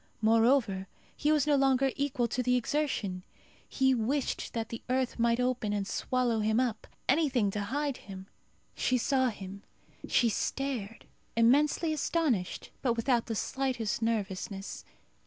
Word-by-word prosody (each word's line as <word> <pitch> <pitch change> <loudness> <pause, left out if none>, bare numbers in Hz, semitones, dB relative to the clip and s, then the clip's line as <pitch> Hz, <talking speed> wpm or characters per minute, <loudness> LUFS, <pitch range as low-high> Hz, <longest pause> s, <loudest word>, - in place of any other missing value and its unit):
Moreover, 225 -3 +3 0.3
he 300 - +1
was 300 -3 +3
no 295 -1 +3
longer 270 -1 +3
equal 270 -4 0
to 250 - -1
the 250 0 +2
exertion. 245 -8 -1 0.5
He 265 -1 +3
wished 255 +4 -1
that 225 -1 -3
the 230 - -6
earth 255 -1 0
might 235 +1 +3
open 250 -4 0
and 205 -1 -1
swallow 250 -3 0
him 220 +2 +2
up. 240 -4 -1 0.2
Anything 265 -8 +2
to 210 - -3
hide 280 +4 -2
him. 190 -1 -10 0.5
She 255 - +1
saw 260 +1 +2
him. 200 -2 -8 0.5
She 240 - +3
stared, 230 -2 -2 0.3
immensely 290 +7 +3
astonished, 290 - -1
but 245 -3 +2
without 235 0 +1
the 225 - -2
slightest 250 -2 -1
nervousness. 200 -3 -3
245 Hz, 140 wpm, -30 LUFS, 220-270 Hz, 0.5 s, Moreover